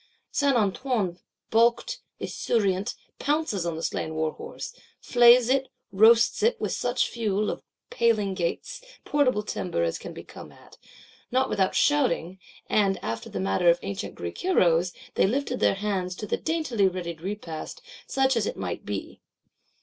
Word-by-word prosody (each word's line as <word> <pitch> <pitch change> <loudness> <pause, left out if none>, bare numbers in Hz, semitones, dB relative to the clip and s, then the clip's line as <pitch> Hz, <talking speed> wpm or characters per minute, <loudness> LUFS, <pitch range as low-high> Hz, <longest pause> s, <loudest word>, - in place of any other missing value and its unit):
Saint 280 -3 +2
Antoine, 205 -3 0 0.3
baulked, 235 +1 +2 0.2
esurient, 200 -4 0 0.2
pounces 285 - 0
on 170 - -2
the 165 - -6
slain 160 - -2
warhorse; 160 0 -4 0.3
flays 240 0 +6
it; 265 +1 +2 0.2
roasts 225 - +5
it, 465 +2 +2
with - - -2
such - - 0
fuel, 215 -3 -1
of - - -6 0.3
paling, 215 -4 +2
gates, 175 - -3 0.2
portable 255 -7 +2
timber 180 - -2
as 85 -1 -1
can - - -8
be - - -9
come - - -12
at,—not 260 +1 -5
without 190 -2 +1
shouting: 190 - +2 0.3
and, 200 -2 +2
after 115 0 -4
the 95 - -4
manner 95 - +2
of 170 - +5
ancient 200 +1 -5
Greek - - -6
Heroes, 180 - +3 0.2
they - - +3
lifted 255 +2 -1
their - - +3
hands 195 -3 -2
to 210 - -6
the - - 0
daintily 305 -11 0
readied 170 -3 -4
repast; 180 -4 -6 0.3
such 265 -1 +2
as 225 -3 +1
it - - -4
might 90 -2 -4
be. 100 -1 -6
205 Hz, 150 wpm, -26 LUFS, 175-245 Hz, 0.3 s, flays